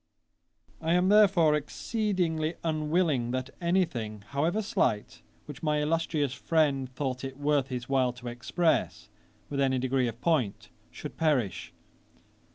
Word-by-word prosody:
I 165 +1 +1
am 180 +1 +3
therefore 195 -7 +5
exceedingly 165 0 -1
unwilling 155 -5 +1
that 130 +1 -3
any 180 +2 +3
thing, 110 -7 -6
however 165 +10 0
slight, 105 - -1 0.2
which 145 -2 -9
my 150 -2 +1
illustrious 150 -2 0
friend 140 -5 +1
thought 130 -2 -3
it 135 0 -6
worth 145 -2 +1
his 125 -2 -5
while 130 -2 +2
to 120 0 -10
express, 120 +8 -1 0.4
with 140 - -4
any 130 -1 +2
degree 130 0 +1
of 115 0 -6
point, 130 -10 0 0.2
should - - -9
perish. 140 - 0
145 Hz, 135 wpm, -28 LUFS, 130-165 Hz, 0.4 s, therefore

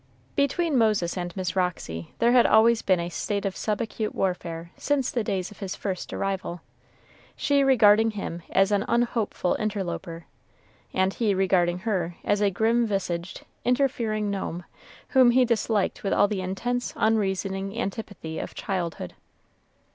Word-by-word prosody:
Between 280 0 +1
Moses 210 -6 +2
and 175 0 -5
Miss 185 -1 -2
Roxy 165 - -2
there 235 +1 +3
had 245 -1 +6
always 225 +1 +5
been 185 -2 +2
a 170 0 -3
state 200 +3 -2
of 195 -1 -2
sub 210 -1 -1
acute 220 -1 -3
warfare 170 -3 -2
since 285 -3 0
the 235 - -1
days 195 -1 -2
of 210 - -14
his 195 -3 -4
first 190 -3 -4
arrival, 190 -3 -3 0.7
she 280 -1 +2
regarding 225 -4 +5
him 195 -5 -5
as 195 +1 +3
an 205 -1 +2
unhopeful 235 -6 0
interloper, 185 -5 -4 0.7
and 190 +1 +1
he 215 -4 +1
regarding 180 -2 +2
her 180 -4 -2
as 205 0 +1
a 205 - +4
grim 225 +5 +2
visaged, 185 -3 -3 0.2
interfering 235 -5 0
gnome, 180 -3 -4 0.5
whom 260 -2 +6
he 250 +1 +5
disliked 225 -3 0
with 195 - 0
all - - +4
the 200 -2 -2
intense, 240 +7 -2
unreasoning 195 -2 0
antipathy 195 -7 -5
of - - -6
childhood. 175 - -3
200 Hz, 150 wpm, -26 LUFS, 185-225 Hz, 0.7 s, had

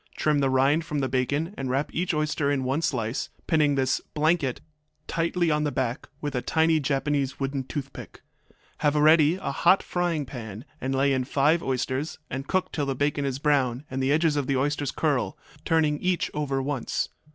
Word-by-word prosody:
Trim 150 -1 +2
the 135 -1 +2
rind 135 +5 +3
from 150 -1 -4
the 135 -2 0
bacon 140 - -1
and 135 -1 -2
wrap 135 +3 -1
each 175 +2 0
oyster 150 -2 0
in 140 -2 0
one 135 +5 0
slice, 120 -5 -1 0.2
pinning 150 -3 +3
this 130 -1 +1
``blanket'' 155 -4 +2 0.5
tightly 170 +1 0
on 150 0 +1
the 150 - 0
back 125 -3 -2
with 145 -1 -3
a 125 - -1
tiny 160 +2 +2
Japanese 140 -1 -1
wooden 135 0 -2
toothpick. 140 0 -7 0.6
Have 150 0 +2
ready 155 +1 +5
a 185 -7 -4
hot 175 +7 +4
frying 175 -4 -1
pan, 115 -3 -8 0.2
and 135 +1 -1
lay 135 +1 +3
in 130 -1 +1
five 145 +5 +2
oysters, 130 +2 -2
and 135 +1 -4
cook 185 -1 0
till 145 -3 -2
the 135 - -1
bacon 145 +1 0
is 135 -2 -1
brown 140 -3 +1
and 130 0 -2
the 130 +1 +1
edges 155 0 +3
of 145 -3 -1
the 135 - +1
oysters 145 +1 0
curl, 140 -6 0 0.3
turning 155 -3 +2
each 180 -1 0
over 140 -3 -1
once. 135 -3 -2
145 Hz, 190 wpm, -26 LUFS, 135-155 Hz, 0.6 s, ready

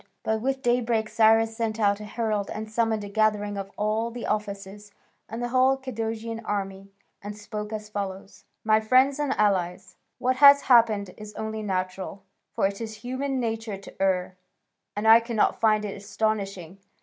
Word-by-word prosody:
But 220 0 -1
with 265 +2 -2
daybreak 235 -2 +1
Cyrus 225 0 +4
sent 225 -1 -2
out 205 -1 +2
a 210 - -7
herald 215 -2 -2
and 215 0 -6
summoned 220 -1 0
a - - -6
gathering 205 0 +1
of 195 -1 -5
all 215 +2 0
the 235 0 -7
officers 205 0 -4 0.4
and 230 +2 -5
the 240 - -2
whole 260 +2 +3
Cadousian 225 -3 -4
army, 195 -2 -4 0.3
and 205 +1 -7
spoke 210 0 -6
as 215 -1 -5
follows: 195 -2 -6 0.2
"My 215 0 +4
friends 255 +5 +3
and 290 -2 0
allies, 185 -2 0 0.2
what 255 +1 0
has 280 0 +8
happened 220 -6 +3
is 210 -1 -10
only 220 0 -4
natural; 190 -1 -4 0.3
for - - 0
it 200 +2 -2
is 220 -1 -5
human 265 +1 -2
nature 225 -3 -3
to 195 0 -13
err, 185 -1 0 0.6
and 210 +2 -1
I 225 +1 +9
cannot 230 -2 0
find 215 -1 +3
it 200 - -5
astonishing. 200 -3 -3
215 Hz, 170 wpm, -26 LUFS, 200-230 Hz, 0.6 s, I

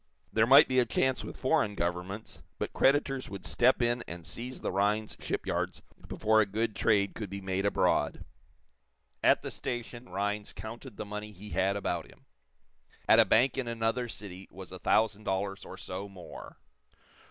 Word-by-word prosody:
There 110 0 +4
might 135 +3 +9
be 130 0 +3
a 125 - +4
chance 130 +3 +1
with - - -8
foreign 130 -6 +2
governments, 90 +4 -4 0.2
but - - -3
creditors 135 -1 +2
would 100 0 -7
step 125 0 +3
in 120 0 +1
and 85 -1 -7
seize 125 +7 -6
the - - -2
Rhinds 105 +2 +1
shipyards - - -2 0.2
before 110 0 +3
a 105 - +1
good 110 +2 -1
trade 100 -1 +2
could 105 -4 -6
be 100 +1 -5
made 95 +1 -1
abroad. - - +1 1.0
At - - +5
the - - -4
station 120 -3 -5
Rhinds 100 +2 -2
counted 115 +1 -8
the - - -4
money 105 +1 -6
he 105 +2 -11
had 95 +1 +1
about 90 -4 -2
him. - - -20 0.8
At - - +7
a - - +8
bank 125 +4 +3
in 130 - -2
another 115 +1 -1
city 95 -3 -8
was 95 0 -10
a 95 - -7
thousand 110 +1 +2
dollars 95 0 -2
or - - -9
so 95 +2 -5
more. 95 -3 -10
105 Hz, 175 wpm, -30 LUFS, 95-120 Hz, 1.0 s, might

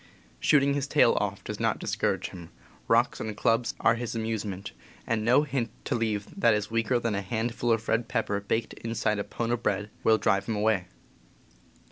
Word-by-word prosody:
Shooting 140 -1 +4
his 140 -1 -1
tail - - +4
off - - -3
does - - -6
not - - +1
discourage - - -1
him, 85 -3 -10 0.4
rocks - - +3
and 110 -1 -4
clubs 115 +2 +1
are - - +4
his 120 0 -4
amuse 110 -1 -2
ment, 100 -2 -6 0.3
and 115 -2 0
no 125 +6 +5
hint 135 -5 -2 0.2
to - - -1
leave 110 -4 -1
that 115 - +5
is 105 +1 -3
weaker 115 +2 +1
than 115 -2 -1
a 100 - -1
hand 115 +4 -2
ful 120 0 0
of 115 0 0
red 115 +1 +1
pepper 100 0 -1
baked 110 +3 -2
inside 110 -2 -1
a - - -1
pone 115 +2 -3
o' 120 - +2
bread 105 -2 -2
will 110 0 +5
drive 100 -2 +1
him 115 - -1
away. 105 -3 +1
115 Hz, 200 wpm, -28 LUFS, 105-120 Hz, 0.4 s, no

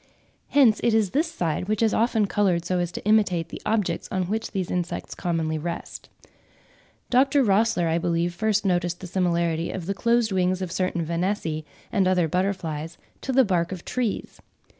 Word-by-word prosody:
Hence 250 -7 +5
it 235 -2 +2
is 210 -4 +2
this 320 +4 0
side 170 - -2
which 215 +1 0
is 220 - +3
often 225 -1 +2
coloured 190 -4 +1
so 180 0 0
as 175 -1 -1
to - - -7
imitate 195 -6 +2
the - - -8
objects 210 -6 0
on 185 -1 0
which 215 +5 -2
these 190 -3 -3
insects 175 -1 -3
commonly 160 -2 -1
rest. 170 +2 -6 1.0
Dr. 270 +2 +4
Rossler, 215 -4 +2
I 165 +1 +1
believe, 170 0 0
first 215 +2 0
noticed 175 -2 0
the - - -8
similarity 170 -2 0
of 185 -3 -5
the 200 - -1
closed 235 +1 +1
wings 185 -1 +1
of 185 -3 -4
certain 180 -2 -1
Vanessae 165 -2 -2 0.3
and 195 -4 +2
other 180 -3 +3
butterflies 170 -3 -2 0.2
to 265 - -3
the 260 0 +5
bark 175 -3 0
of 185 -2 -7
trees. 245 -5 -3
185 Hz, 180 wpm, -25 LUFS, 170-215 Hz, 1.0 s, Hence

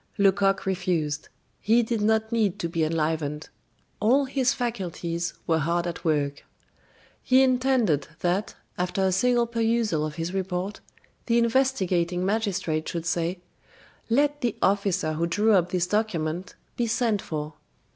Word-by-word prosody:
Lecoq 195 -1 +3
refused; 175 -6 -1 0.3
he 230 +3 +3
did 225 -1 -2
not 220 +1 +1
need 210 -5 +1
to 175 - -2
be 165 -1 -1
enlivened. 155 -1 -1 0.5
All 255 +7 +3
his 260 -1 +1
faculties 175 -8 -3
were 160 -1 +2
hard 170 +3 0
at 170 -1 -5
work. 145 -3 0 0.8
He 260 +1 +4
intended 255 - +2
that, 180 +4 0 0.2
after 180 +2 0
a 190 - +3
single 240 +5 +3
perusal 230 -7 0
of 155 -1 -4
his 165 +3 -4
report, 190 +1 -3 0.5
the 235 0 +3
investigating 190 -8 +1
magistrate 195 -7 -1
should 170 -2 -4
say: 175 +1 -1 0.7
"Let 290 +4 +2
the 240 -4 0
officer 195 -5 +1
who 165 +2 0
drew 210 +6 +2
up 180 -3 +3
this 180 -1 0
document 180 -4 -2 0.2
be 240 - 0
sent 225 -3 +1
for." 150 -1 -5
190 Hz, 140 wpm, -26 LUFS, 170-230 Hz, 0.8 s, He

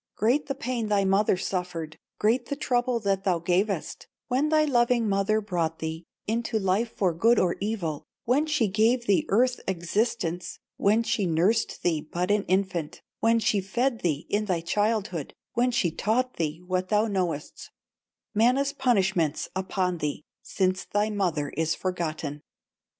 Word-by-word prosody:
Great 250 +8 +1
the 275 - -2
pain 255 -5 -2
thy 205 -2 +2
mother 195 0 +3
suffered, 180 -4 -3 0.2
Great 235 +4 +1
the 285 - -2
trouble 245 -3 0
that 195 -3 0
thou 185 -3 +2
gavest 180 +2 -1 0.2
When 265 +4 +2
thy 310 0 +4
loving 240 -4 +2
mother 200 +2 +1
brought 170 -6 -2
thee 160 +1 -5 0.2
Into 230 +1 -1
life 200 +3 +1
for 185 -5 0
good 225 +8 +4
or 175 -1 +2
evil, 190 -8 -3 0.2
When 280 +6 +2
she 300 -8 +2
gave 225 +5 +2
thee 200 -4 +2
earth 250 +5 +3
existence, 180 0 -1 0.2
When 215 +3 +3
she 215 -4 0
nursed 180 +8 +1
thee 160 -3 +1
but 175 +5 -2
an 205 -1 +2
infant, 185 -5 -1 0.2
When 230 +1 +3
she 215 -3 +1
fed 235 +6 0
thee 155 -4 -1
in 210 +1 0
thy 180 -5 0
childhood, 205 -3 -1 0.2
When 245 +1 +2
she 205 -9 +1
taught 245 +9 0
thee 160 +1 -2
what 185 0 -1
thou 210 +1 +3
knowest, 180 -8 -3 0.6
Mana's 255 +6 +3
punishments 195 - +1
upon 185 -2 -1
thee, 150 -1 -3 0.2
Since 185 -1 -1
thy 210 +1 0
mother 170 -8 -1
is 160 +2 -1
forgotten! 155 -5 -3
200 Hz, 155 wpm, -26 LUFS, 175-230 Hz, 0.6 s, thy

